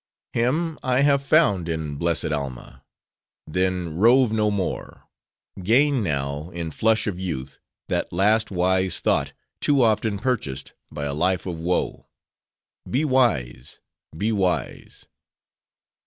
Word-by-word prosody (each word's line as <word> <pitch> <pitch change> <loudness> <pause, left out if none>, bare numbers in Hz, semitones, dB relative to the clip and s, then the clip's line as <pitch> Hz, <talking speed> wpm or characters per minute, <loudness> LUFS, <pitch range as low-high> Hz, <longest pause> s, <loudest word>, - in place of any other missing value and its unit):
Him 150 +7 0
I 130 +1 +1
have 140 -1 +3
found 120 - +2
in 80 -3 -3
blessed 85 +1 -1
Alma. 70 -4 -5 0.6
Then 90 -1 -1
rove 120 +3 +5
no 105 -1 +2
more. 100 -3 -4 0.5
Gain 130 +7 +3
now, 70 -2 -2
in 85 -2 -5
flush 110 +5 +2
of 95 -4 -3
youth, 70 -8 -5 0.3
that - - -1
last 105 +5 +2
wise 95 0 +1
thought, - - +1 0.3
too 140 -3 +3
often 110 -2 +1
purchased, 105 - -3 0.2
by 75 - -4
a 70 - -2
life 90 +4 +1
of 85 -3 -4
woe. 85 +2 -2 0.8
Be 140 +5 +1
wise: 90 - 0 0.4
be 105 +5 0
wise. 95 -4 -2
95 Hz, 125 wpm, -23 LUFS, 80-115 Hz, 0.8 s, rove